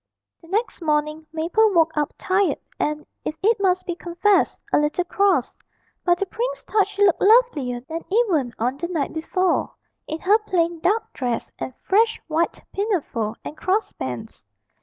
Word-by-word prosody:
The 330 - -16
next 420 +2 -1
morning 305 0 0
Mabel 345 +8 +2
woke 325 -1 +3
up 300 -1 0
tired, 380 +1 +1 0.2
and, 300 0 -1 0.2
if 310 - -3
it 450 +2 +4
must 370 -2 +1
be 350 - -2
confessed, 350 +4 +1
a - - +6
little 295 +4 +1
cross; 400 +2 +1 0.4
but 350 -1 +3
the 395 - -1
prince - - -3
thought 415 -3 +2
she 405 0 +2
looked 370 - +3
lovelier 380 - +4
than 320 +6 -6
even 370 - +2
on 250 +4 -1
the 345 +4 -3
night 335 -5 -2
before, 365 +3 0 0.3
in 315 - -4
her 410 +4 +4
plain 345 -5 0
dark 400 +7 0
dress 245 -3 -3
and 260 - -5
fresh 445 +3 +3
white 325 +1 -1
pinafore 310 - -1
and - - -6
crossbands. 305 - -3
350 Hz, 160 wpm, -23 LUFS, 305-405 Hz, 0.4 s, a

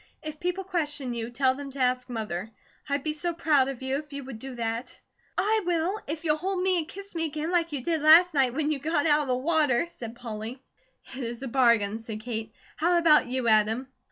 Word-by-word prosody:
If 310 -1 -6
people 360 +2 -2
question 295 -8 -2
you, 230 0 -4
tell 260 +2 +2
them 280 +1 -7
to 275 0 -9
ask 250 0 +1
Mother. 215 -4 -4 0.4
I'd 280 -1 0
be 310 - -1
so 340 +2 -2
proud 295 -5 +3
of 265 -2 -5
you, 265 +1 0
if 295 0 -8
you 280 0 -5
would 255 -4 -8
do 265 +1 -7
that." 230 +1 -4 0.4
"I 435 +2 +2
WILL, 350 +4 0
if 310 +2 -4
you'll 305 -1 +2
hold 375 +3 -2
me 370 -1 +3
and 315 - -4
kiss 395 +3 -10
me 325 -1 -1
again 310 +2 -3
like 335 -2 +1
you 280 -4 -4
did 325 0 0
last 330 +3 +7
night 260 -4 +2
when 305 0 0
you 295 - -1
got 295 +1 0
out 300 -1 +4
of 290 - -4
the 255 - +1
water," 295 -2 +2
said 235 -9 -9
Polly. 230 +1 -6 0.6
"It 265 - -5
is 235 +2 -5
a - - -3
bargain," 235 -4 +3
said 225 -1 -7
Kate. 220 -1 -4 0.3
"How 345 +3 +3
about 320 -5 +5
you, 255 -1 -1
Adam?" 220 +4 +3
280 Hz, 230 wpm, -27 LUFS, 240-325 Hz, 0.6 s, last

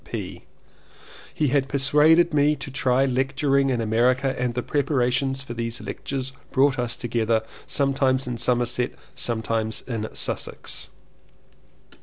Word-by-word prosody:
C. - - -21
P. - - -6 0.9
He 150 - 0
had 135 0 +1
persuaded 150 +5 +4
me 150 +1 +3
to 135 - -8
try 130 0 +2
lecturing 135 +1 +1
in 125 -3 0
America 125 +4 +2
and 125 -1 -2
the 125 - -1
prepar 140 +3 0
ations 135 +2 -1
for 120 - -6
these 115 0 -3
lectures 130 -1 -5 0.2
brought 135 0 +3
us 120 -1 0
much - - -3
together 115 -2 0 0.2
sometimes 135 -1 +1
in 120 -1 -3
Somerset, 120 0 +1 0.2
sometimes 110 -1 -2
in 110 -4 -4
Sussex. - - -3
130 Hz, 140 wpm, -24 LUFS, 120-140 Hz, 0.9 s, persuaded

